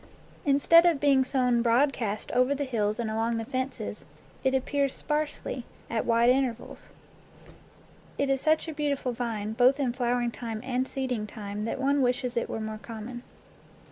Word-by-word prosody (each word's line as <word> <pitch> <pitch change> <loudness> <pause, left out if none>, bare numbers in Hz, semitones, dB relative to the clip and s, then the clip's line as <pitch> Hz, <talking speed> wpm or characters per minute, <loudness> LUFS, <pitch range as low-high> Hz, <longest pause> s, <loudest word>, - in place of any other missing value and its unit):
Instead 290 +4 +6
of 330 -5 +2
being 275 -2 +4
sown 250 -2 +2
broadcast 235 -3 +1
over 255 +3 +3
the 285 - -2
hills 215 -5 -1
and 230 -2 -2
along 225 +1 0
the 225 - -3
fences, 260 +1 -4 0.4
it 265 0 +2
appears 275 +1 0
sparsely, 300 -4 -3 0.3
at 225 -1 -1
wide 235 +1 +5
intervals. 255 -3 -2 1.3
It 280 - +1
is 270 -1 +1
such 315 +1 +2
a 320 - -4
beautiful 285 -4 -1
vine 225 -3 -3
both 255 +4 +4
in 255 -4 0
flowering 245 -1 0
time 225 -2 -5
and 255 0 -1
seeding 250 -5 -3
time 205 -1 -5
that 230 - -3
one 280 +1 +2
wishes 250 0 0
it 235 - -1
were - - -3
more 215 0 -5
common. 230 +2 -7
250 Hz, 165 wpm, -28 LUFS, 230-275 Hz, 1.3 s, Instead